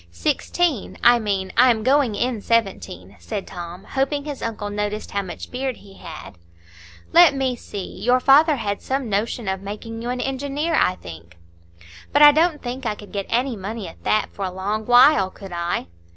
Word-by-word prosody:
"Sixteen; 240 - -1
I 240 0 +6
mean, 195 -3 -2
I 255 - +6
am 220 -3 +1
going 260 -3 +2
in 240 -1 -1
seventeen," 100 - -2
said 85 - -5
Tom, 175 +1 -8
hoping 280 +2 -2
his 290 -2 -6
uncle 210 -2 -4
noticed 210 +1 -3
how 200 - -1
much 185 -3 -8
beard 260 0 -3
he 195 -1 -16
had. 155 - -10 0.7
"Let 340 -4 +7
me 265 -2 0
see; 200 -6 -8
your 245 +4 +3
father 295 +4 +5
had 205 -5 -3
some 265 -4 -3
notion 215 +2 -1
of 190 0 -2
making 220 +3 -7
you 240 - -4
an 250 0 -2
engineer, 280 +5 -2
I 185 -11 +3
think?" 85 - -12 0.7
"But 290 - +5
I 295 - +11
don't 315 +1 +1
think 250 +2 -5
I 210 - -1
could 205 0 -13
get 200 -1 -4
any 250 +1 0
money 205 0 -6
at 165 - -13
that 215 - +1
for 200 - -6
a 185 - -2
long 205 +4 -3
while, 245 -5 +6
could 195 0 -12
I?" 170 - -2
220 Hz, 190 wpm, -22 LUFS, 195-265 Hz, 0.7 s, I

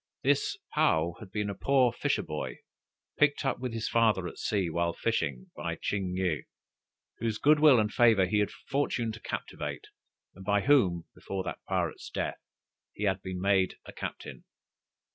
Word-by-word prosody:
This - - +2 0.2
Paou 80 +2 +2
had 100 -3 -11
been 105 0 -1
a 100 - -2
poor 130 +2 +3
fisher - - 0
boy, 75 -1 -5 0.6
picked 150 -1 +3
up 135 - 0
with 125 -1 -3
his 115 -1 -3
father 110 -6 +2
at - - -9
sea, 100 -4 0
while 85 +1 0
fishing, 70 - -2
by - - -3
Ching 95 -3 -2
yih, 90 -5 0 0.7
whose 115 -1 -1
good 150 +5 +5
will 145 -5 +7
and 105 0 0
favor 115 -6 +5
he 105 +3 +1
had 105 -1 +2
the - - -13
fortune 130 -5 0
to 110 - -9
captivate, - - -5 0.4
and 95 - -12
by 100 +1 +2
whom, 95 - +3
before 95 -1 -5
that - - -5
pirate's - - -2
death, - - -3 0.5
he 105 - -6
had 95 -2 +1
been 95 -1 -5
made 95 -1 +2
a - - -10
captain. - - -7
105 Hz, 175 wpm, -29 LUFS, 90-115 Hz, 0.7 s, will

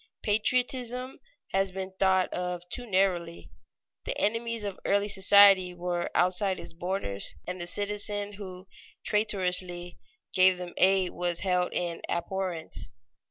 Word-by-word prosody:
Patriotism 250 +3 0 0.3
has 195 0 +1
been 190 0 -6
thought 190 -1 +3
of 180 -1 -4
too 245 +4 -4
narrowly. 185 -4 0 0.5
The - - -3
enemies 230 +1 -1
of 200 -2 -5
early 200 +1 +2
society 195 -2 +6
were 175 0 -2
outside 185 +2 +2
its - - -9
borders, 170 - -4
and 180 0 -5
the 175 - -4
citizen 205 +2 -1
who 190 -2 -9 0.4
traitorously 180 -4 0 0.3
gave 185 -1 +5
them 180 -1 -7
aid 190 -1 +3
was 175 -1 -2
held 180 -2 +1
in 170 -1 -2
abhorrence. 175 - -4
190 Hz, 125 wpm, -28 LUFS, 180-205 Hz, 0.5 s, society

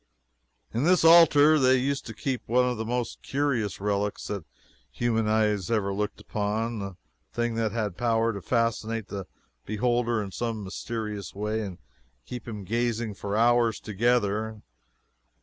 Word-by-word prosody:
In 120 - 0
this 180 +2 +4
altar 155 -2 +7
they 130 -1 +5
used 135 +1 -1
to 110 - -7
keep 130 +1 -2
one 125 +2 +3
of 125 -2 -1
the 110 - -3
most 120 +1 -3
curious 135 -8 -1
relics 100 0 -1
that 100 -5 -4 0.5
human 115 -2 0
eyes 105 -3 +1
ever 105 -4 +1
looked 105 +1 -3
upon 110 +2 -2
a 100 -2 -6 0.3
thing 120 0 -1
that 115 -1 0
had 105 -4 -2
power 115 -1 +1
to 100 - -6
fascinate 115 0 -1
the 100 -2 -5 0.4
beholder 120 +2 0
in 100 - -7
some 115 0 -3
mysterious 105 +1 -5
way 105 +2 -1
and 95 -5 -6 0.5
keep 120 -2 -7
him 105 -3 -6
gazing 115 +1 -1
for 100 +1 -3
hours 120 -1 +3
together. 110 -1 0
115 Hz, 150 wpm, -27 LUFS, 105-120 Hz, 0.5 s, altar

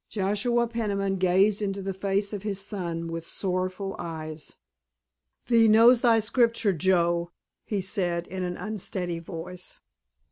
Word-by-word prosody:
Joshua 215 +4 +1
Peniman 200 -4 -1
gazed 190 +3 +3
into 195 -1 -2
the 195 0 -3
face 200 +2 -1
of 205 - -4
his 200 -2 -3
son 175 -5 -4
with 165 0 -5
sorrowful 185 +2 -3
eyes. 155 -2 -6 0.9
"Thee 230 -2 +5
knows 230 +3 +6
thy 230 -2 +5
Scripture, 230 -2 +2
Joe," 170 -1 +1 0.4
he 205 -3 -1
said 175 -2 -1
in 185 +1 -6
an 180 -1 -3
unsteady 185 -5 -4
voice. 175 +2 -8
195 Hz, 135 wpm, -26 LUFS, 175-210 Hz, 0.9 s, knows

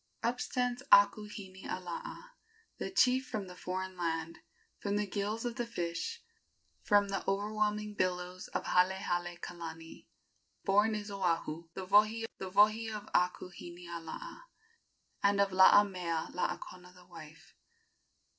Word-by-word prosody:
Up 240 +2 0
stands 250 0 -1
Akuhinialaa, 200 - +1 0.5
The - - -3
chief 260 -6 +3
from 210 -5 -3
the 180 -1 -10
foreign 185 +1 -4
land; 165 -1 -2 0.4
From 200 0 -1
the 210 0 +1
gills 205 +3 -2
of 240 0 -3
the 240 - -1
fish 175 - -3 0.6
From 205 -1 +3
the 195 - -2
overwhelming 210 +1 0
billows 180 -1 -2
of - - -3
Halehale 180 -1 +1
kalani, 165 -1 -8 0.6
Born 210 +2 +4
is 205 -1 -5
Oahu, 170 -4 -1
the 190 - -5
wohi, 215 +4 +4
The 190 - -4
wohi 215 +3 +4
of 210 -1 -5
Akuhinialaa, 175 - -3 0.8
And 200 0 +3
of 200 -1 +3
Laamealaakona 180 -1 +2
the 180 0 -17
wife." 165 -1 -13
195 Hz, 115 wpm, -33 LUFS, 175-210 Hz, 0.8 s, Born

